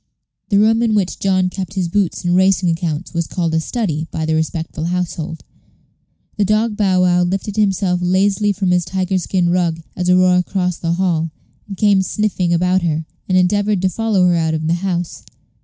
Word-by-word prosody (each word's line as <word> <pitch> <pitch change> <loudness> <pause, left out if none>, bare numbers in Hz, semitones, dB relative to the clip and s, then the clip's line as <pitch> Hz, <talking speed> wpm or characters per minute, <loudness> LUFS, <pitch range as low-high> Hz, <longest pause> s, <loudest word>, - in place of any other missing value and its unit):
The 200 - +3
room 220 +2 +3
in 225 -2 +1
which 195 -3 -1
John 185 -2 +1
kept 190 0 -6
his 185 -2 0
boots 185 0 -1
and 175 0 +2
racing 190 -1 +3
accounts 165 0 -3
was 170 -1 -1
called 170 -3 -2
a 160 - +2
"study" 160 - -2
by 160 -1 -3
the 160 - 0
respectful 160 0 -2
household. 170 -2 -3 0.9
The 210 - +2
dog 215 +2 +1
Bow 190 -3 +2
wow 180 0 +3
lifted 195 +3 -2
himself 195 -4 +1
lazily 195 +3 +2
from 195 -2 -1
his 180 0 +2
tiger 185 +1 -1
skin 180 -1 0
rug 170 -2 0
as 180 0 -1
Aurora 180 0 +4
crossed 180 -1 -2
the 170 0 0
hall, 170 -3 0 0.4
and 195 - -7
came 200 -1 +3
sniffing 190 -3 -1
about 180 +2 +2
her, 160 -2 -1 0.2
and 185 - +3
endeavored 205 +2 +2
to 190 - +3
follow 215 -2 +1
her 180 - +3
out 160 -1 0
of 155 0 -3
the 165 - +1
house. 180 -3 -3
180 Hz, 190 wpm, -18 LUFS, 170-195 Hz, 0.9 s, Aurora